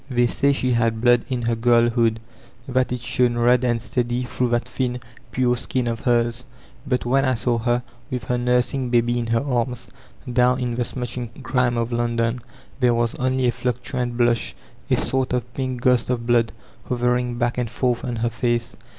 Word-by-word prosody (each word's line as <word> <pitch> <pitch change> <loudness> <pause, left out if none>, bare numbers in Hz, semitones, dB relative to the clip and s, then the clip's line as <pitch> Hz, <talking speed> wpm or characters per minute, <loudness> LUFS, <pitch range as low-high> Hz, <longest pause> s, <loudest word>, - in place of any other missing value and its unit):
They 120 -2 +2
say 140 +4 +2
she 130 -2 0
had 115 -1 +1
blood 120 0 +4
in 125 -2 -2
her 115 0 +1
girlhood, 115 -1 +3 0.5
that 130 -1 +1
it 125 -1 -3
shone 120 -1 +1
red 120 +1 +4
and 120 -2 +1
steady 120 +1 -1
through 125 0 -1
that 120 0 0
thin, 125 -1 -2 0.3
pure 125 -1 +2
skin 125 +1 -2
of 115 -1 -2
hers; 120 -1 +1 0.4
but 125 -2 0
when 135 +3 +3
I 130 -2 +2
saw 120 0 0
her, 120 +1 0 0.3
with 125 -4 -3
her 125 +2 -1
nursing 125 +1 +1
baby 120 0 +2
in 115 - -3
her 115 +2 +1
arms, 125 -2 -2 0.4
down 125 +1 +3
in 125 -1 -1
the 120 0 -1
smutching 125 0 -5
grime 125 -2 +1
of 115 +1 -1
London, 120 0 0 0.4
there 125 -2 +3
was 115 -1 +1
only 130 0 0
a - - +3
fluctuant 125 0 -3
blush, 120 -1 +1 0.3
a - - +3
sort 130 -1 0
of 125 0 -2
pink 130 -2 -3
ghost 125 -2 +3
of 120 -2 -1
blood, 120 -2 +3 0.3
hovering 125 0 0
back 120 0 0
and 120 -2 -1
forth 120 +1 -1
on 120 -2 -3
her 115 +1 -1
face. 120 0 -1
120 Hz, 190 wpm, -22 LUFS, 120-125 Hz, 0.5 s, blood